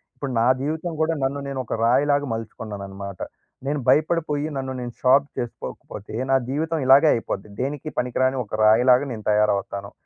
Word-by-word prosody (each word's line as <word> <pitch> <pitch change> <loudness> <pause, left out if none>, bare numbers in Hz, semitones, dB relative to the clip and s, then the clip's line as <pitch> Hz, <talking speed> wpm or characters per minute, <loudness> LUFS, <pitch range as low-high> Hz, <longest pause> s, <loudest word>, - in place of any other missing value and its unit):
ఇప్పుడు 140 -2 -5
నా 115 - +3 0.2
జీవితం 160 +4 -2
కూడా, 160 +1 +2
నన్ను 140 +2 -1
నేను 135 -1 -4
ఒక - - -4
రాయిలాగా 145 +4 +3
మలుచుకున్నాననమాట. 100 -4 -6 0.5
నేను 145 +1 -1
భయపడిపోయి 155 -1 +2
నన్ను 130 0 -3
నేను 120 -1 -6
షార్ప్ 135 +2 +4
చేసుకోకపోతే, 110 -3 -7 0.2
నా - - +5
జీవితం 160 +4 -1
ఇలాగే 135 +4 +7
అయిపోద్ది. 105 -2 -4
దేనికి 145 +3 -3
పనికిరాని 130 +1 +1
ఒక 110 0 -5
రాయిలాగా 125 +5 +5
నేను 110 -2 -6
తయారవుతాను. 100 -1 0
130 Hz, 150 wpm, -23 LUFS, 110-145 Hz, 0.5 s, ఇలాగే